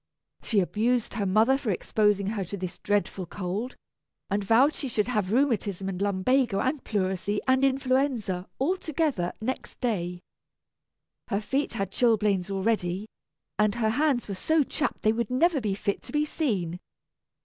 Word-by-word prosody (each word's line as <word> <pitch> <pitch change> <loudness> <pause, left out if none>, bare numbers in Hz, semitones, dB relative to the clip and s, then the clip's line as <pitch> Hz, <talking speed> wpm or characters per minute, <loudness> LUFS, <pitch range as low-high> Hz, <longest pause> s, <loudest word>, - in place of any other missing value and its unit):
She 210 -4 +2
abused 225 +5 0
her 210 -4 -1
mother 225 +8 +4
for 245 - -3
exposing 205 +1 +1
her 210 -2 -2
to 200 +3 -6
this 185 -1 -6
dreadful 200 -3 -1
cold, 205 +7 -4 0.6
and 200 +1 +1
vowed 245 +9 +4
she 275 - -4
should 215 -3 0
have 210 -6 0
rheumatism 215 -7 +1
and 190 -1 -4
lumbago 205 +3 +2
and 260 +5 -1
pleurisy 200 0 -1
and 260 +1 +3
influenza, 260 -8 +1
all 340 +9 +1
together, 300 - -1
next 255 +4 -4
day. 180 -7 -1 1.1
Her 200 - 0
feet 270 +7 -1
had 195 -1 -2
chilblains 210 -5 +2
already, 195 -1 0 0.5
and 210 -1 +3
her 220 -2 +1
hands 275 -1 +1
were 200 - -3
so 310 +11 +2
chapped 285 +2 -3
they 215 - +4
would 235 -1 -2
never 285 +3 +2
be 205 -3 -1
fit 200 0 -2
to - - -11
be 300 0 +1
seen. 195 - -2
215 Hz, 160 wpm, -27 LUFS, 195-260 Hz, 1.1 s, mother